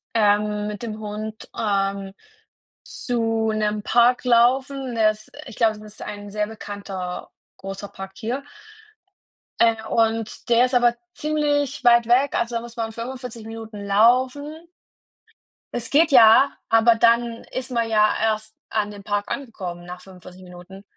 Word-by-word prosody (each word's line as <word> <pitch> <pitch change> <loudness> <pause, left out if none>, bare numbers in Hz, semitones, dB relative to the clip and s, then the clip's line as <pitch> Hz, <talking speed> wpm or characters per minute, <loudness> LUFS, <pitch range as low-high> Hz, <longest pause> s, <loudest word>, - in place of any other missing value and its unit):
ähm, 210 -1 +2
mit 210 +1 -6
dem 220 -2 -5
Hund, 215 +1 -7
ähm, 195 -2 -1 0.7
zu 225 -2 -1
'nem 210 -1 -1
Park 245 +2 +3
laufen. 255 +2 +2
Der 215 -1 +4
ist 215 0 -16 0.2
ich - - -9
glaube, 220 -2 +2
das 210 0 -12
ist 215 - -12
ein 205 -1 -7
sehr 210 0 -1
bekannter, 200 -4 -7 0.3
großer 195 +1 -7
Park 195 0 -9
hier. 240 +7 -3 1.2
Äh, 230 -1 +4
und 225 -1 0
der 235 +1 +5
ist 255 - -4
aber 240 -1 +4 0.2
ziemlich 290 -3 -1
weit 235 -1 +5
weg, 255 +4 +3
also 235 0 -1
da 230 - 0
muss 235 0 -11
man 225 -1 -3
45 240 -1 -7
Minuten 225 -2 -8
laufen. 255 +8 +2 1.2
Es 235 -1 -4
geht 315 +3 +4
ja, 245 +1 +7 0.2
aber 225 +1 +5
dann 235 0 +2
ist 255 0 -4
man 235 -2 0
ja 215 -1 +3
erst 220 0 -1
an 210 -1 -1
dem 200 -1 -11
Park 205 0 -2
angekommen 185 -10 -6
nach 180 0 -8
45 180 0 -14
Minuten. 180 +2 -12
225 Hz, 150 wpm, -22 LUFS, 210-240 Hz, 1.2 s, ja